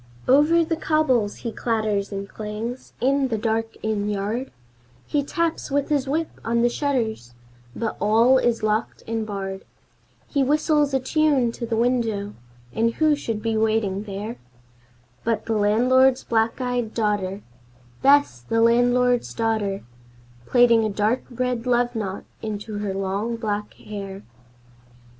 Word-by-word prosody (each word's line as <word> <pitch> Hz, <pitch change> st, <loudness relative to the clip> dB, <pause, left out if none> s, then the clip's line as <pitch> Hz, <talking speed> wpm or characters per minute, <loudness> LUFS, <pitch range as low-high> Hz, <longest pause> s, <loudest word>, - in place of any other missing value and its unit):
Over 300 Hz, +6 st, +5 dB
the 325 Hz, -, -1 dB
cobbles 265 Hz, -10 st, +1 dB
he 230 Hz, -, -1 dB
clatters 215 Hz, -4 st, -1 dB
and 200 Hz, 0 st, -4 dB
clangs 220 Hz, +5 st, -6 dB
in 275 Hz, +1 st, +2 dB
the 225 Hz, -3 st, -1 dB
dark 225 Hz, +1 st, -1 dB
inn 210 Hz, -1 st, -1 dB
yard, 210 Hz, +6 st, -2 dB, 0.6 s
He 290 Hz, -1 st, 0 dB
taps 335 Hz, +3 st, -2 dB
with 285 Hz, 0 st, 0 dB
his 285 Hz, -3 st, +1 dB
whip 315 Hz, +4 st, -2 dB
on 235 Hz, +1 st, +1 dB
the 240 Hz, -, +4 dB
shutters, 230 Hz, -, -2 dB, 0.4 s
but 225 Hz, -1 st, -3 dB
all 230 Hz, +5 st, +5 dB
is 235 Hz, -3 st, 0 dB
locked 215 Hz, +1 st, -1 dB
and 225 Hz, -1 st, -2 dB
barred, 195 Hz, -2 st, -5 dB, 0.6 s
He 280 Hz, -2 st, +1 dB
whistles 295 Hz, 0 st, +2 dB
a -, -, +3 dB
tune 280 Hz, -3 st, +2 dB
to 235 Hz, 0 st, -6 dB
the 225 Hz, -, -1 dB
window, 225 Hz, -4 st, 0 dB, 0.4 s
and 230 Hz, +1 st, +1 dB
who 310 Hz, -1 st, +3 dB
should 225 Hz, -7 st, -4 dB
be 225 Hz, -1 st, 0 dB
waiting 215 Hz, -2 st, 0 dB
there 205 Hz, +3 st, -5 dB, 0.9 s
But 225 Hz, -2 st, -1 dB
the 225 Hz, -, -1 dB
landlord's 250 Hz, +5 st, +4 dB
black 225 Hz, +1 st, 0 dB
eyed 245 Hz, -3 st, -2 dB
daughter 205 Hz, -3 st, -1 dB, 0.6 s
Bess, 280 Hz, -, +4 dB
the 225 Hz, -, -1 dB
landlord's 245 Hz, +1 st, +3 dB
daughter 220 Hz, -4 st, -1 dB, 0.6 s
Plaiting 240 Hz, -2 st, +5 dB
a 215 Hz, -, 0 dB
dark 210 Hz, +5 st, 0 dB
red 250 Hz, -1 st, -2 dB
love 245 Hz, 0 st, +2 dB
knot 200 Hz, -3 st, -3 dB, 0.2 s
into 210 Hz, -1 st, -5 dB
her 200 Hz, -2 st, -3 dB
long 195 Hz, +4 st, -2 dB
black 210 Hz, -2 st, -3 dB
hair. 195 Hz, -2 st, -8 dB
230 Hz, 145 wpm, -23 LUFS, 210-255 Hz, 0.9 s, Over